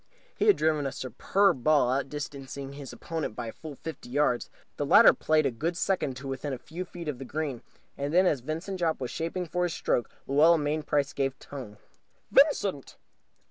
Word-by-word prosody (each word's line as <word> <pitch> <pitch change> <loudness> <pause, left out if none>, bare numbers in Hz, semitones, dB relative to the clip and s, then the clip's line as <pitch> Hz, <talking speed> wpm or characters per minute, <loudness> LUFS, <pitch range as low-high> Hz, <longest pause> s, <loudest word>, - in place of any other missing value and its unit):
He - - 0
had 415 - +6
driven 155 -3 +1
a - - -3
superb 135 - +1
ball, 145 -5 +4
outdistancing 140 0 -4
his 140 -2 -8
opponent 160 -9 -4
by - - -4
a - - -6
full 155 +2 -9
fifty 160 -3 -8
yards. 130 -2 +1 0.3
The - - -1
latter - - +8
played 155 -1 +2
a 135 - +2
good 165 +9 -2
second 165 -10 0
to 135 +1 -7
within 135 +1 -3
a - - -3
few 170 +8 -7
feet 175 -2 -9
of 140 -5 -3
the - - -5
green. 140 -2 -3 0.3
And 140 +1 -3
then, 180 +3 +5
as 150 -6 +2
Vincent 165 +8 -4
Jopp 165 -2 0
was 125 -2 -4
shaping 170 +3 -3
for 180 +2 -2
his 175 -2 0
stroke, 120 - 0 0.2
Luella 155 +5 +5
Mainprice 145 -1 0
gave 135 -1 -1
tongue. 125 -7 -9 0.5
"Vincent!" 205 - +3
150 Hz, 190 wpm, -28 LUFS, 135-165 Hz, 0.5 s, latter